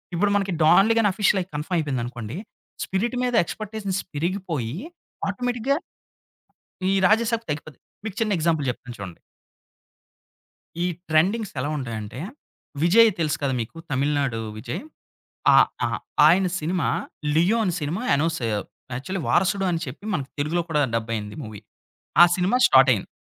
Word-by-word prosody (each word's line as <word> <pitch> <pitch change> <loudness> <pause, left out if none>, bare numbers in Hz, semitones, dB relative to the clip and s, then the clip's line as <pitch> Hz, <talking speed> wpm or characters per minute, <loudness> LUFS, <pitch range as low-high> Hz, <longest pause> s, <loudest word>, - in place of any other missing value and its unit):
ఇప్పుడు 200 +4 +2
మనకి 195 -2 -1
డాన్‌లీ 195 +8 +6
గాని 210 - +4
అఫిశియల్ 200 0 +2
అయి, 185 - -8
కన్ఫార్మ్ 160 +5 -1
అయిపోయింది 140 -6 -1
అనుకోండి. 120 +3 -6 0.5
'స్పిరిట్' 220 +6 -1
మీద 245 - -1
ఎక్స్‌పెక్టేషన్ 210 0 -4 0.2
పెరిగిపోయి 160 - -2 0.5
ఆటోమేటిక్‌గా 245 +5 -1 1.1
ఈ - - +3
'రాజసాబ్‌'కి 225 +3 +2
తగ్గిపోతుంది. 150 0 -7 0.2
మీకు 215 -4 -5
చిన్న 215 -2 +1
ఎగ్జాంపుల్ 160 -3 +1
చెప్తాను 125 0 -6
చూడండి. 95 -4 -8 1.7
ఈ - - +2 0.2
ట్రెండింగ్స్ 190 +7 +2
ఎలా 135 +3 -1
ఉంటాయంటే, 115 -3 -5 0.6
విజయ్ 225 +7 +7
తెలుసు 155 -2 0
కదా! 135 - +1
మీకు 115 +8 -8
తమిళనాడు 140 -3 0 0.2
విజయ్. 115 +3 -5 0.7
ఆ! - - +8 0.3
ఆ! - - -1 0.4
ఆయన 180 +4 +5
సినిమా 165 +1 0 0.5
'లియో' 180 +8 +3
అనే 180 -4 0
సినిమా 155 +9 -2
అనౌన్స్ 165 +2 0 0.5
యాక్చువలి 185 +10 -4
'వారసుడు' 195 +2 +2
అని 165 -2 -1
చెప్పి 130 +9 -9
మన 155 - 0 0.2
తెలుగులో 160 +4 0
కూడా 150 -2 +1
డబ్ 115 0 -1
అయ్యింది 105 -1 -5
మూవీ. 110 -2 -8 0.6
ఆ - - +12
సినిమా 190 +7 +2
స్టార్ట్ 130 0 +6
అయింది. 100 - -4
165 Hz, 140 wpm, -24 LUFS, 135-200 Hz, 1.7 s, ఆ